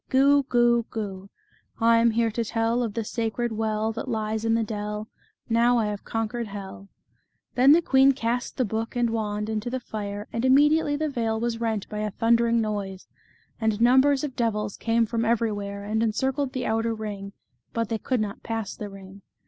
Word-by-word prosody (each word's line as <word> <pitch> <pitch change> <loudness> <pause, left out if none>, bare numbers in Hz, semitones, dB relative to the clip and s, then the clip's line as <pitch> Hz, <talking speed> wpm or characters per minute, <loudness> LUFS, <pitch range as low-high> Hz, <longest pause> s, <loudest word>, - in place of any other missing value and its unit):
Goo! 280 +2 +5
Goo! 240 -1 +3
Goo! 195 -3 -5 0.5
I 230 0 +5
am 235 0 +4
here 230 0 +1
to 235 +2 -1
tell 230 +2 0
Of 225 -4 -3
the 230 - -1
sacred 230 +2 -2
well 220 0 -1
That 225 +3 -6
lies 220 -2 -2
in 225 0 +2
the 230 - +1
dell; 210 0 -4 0.4
Now 235 +1 +3
I 225 - +2
have 205 -1 -5
conquered 225 +1 -3
hell." 200 -1 -9 0.6
Then 260 +3 +6
the 340 +2 +4
queen 270 -1 +5
cast 245 -1 -2
the 255 - +2
book 225 +3 -3
and 240 -1 +1
wand 210 -2 -2
into 220 +1 -2
the 260 +1 -2
fire, 205 -3 -6
and 230 - -2
immediately 290 +3 +4
the 310 +1 -1
vale 230 -5 -1
was 230 0 -2
rent 220 -3 -1
by 210 - -5
a 210 0 -1
thunder 230 +3 +2
ing 235 0 +2
noise, 200 -3 -3 0.5
and 220 -2 0
numbers 265 +4 +4
of 275 -4 -4
devils 210 -3 -1
came 230 0 +1
from 230 +1 -1
every 230 0 +1
where, 200 -1 -5
and 215 +2 -1
encircled 265 +5 0
the 255 -2 -2
outer 225 +1 0
ring, 200 -2 -6 0.4
but 230 -2 -2
they 225 -1 -1
could 255 0 -1
not 210 0 -4
pass 225 -3 -4
the 210 - -6
ring. 195 0 -12
225 Hz, 195 wpm, -25 LUFS, 210-240 Hz, 0.6 s, Then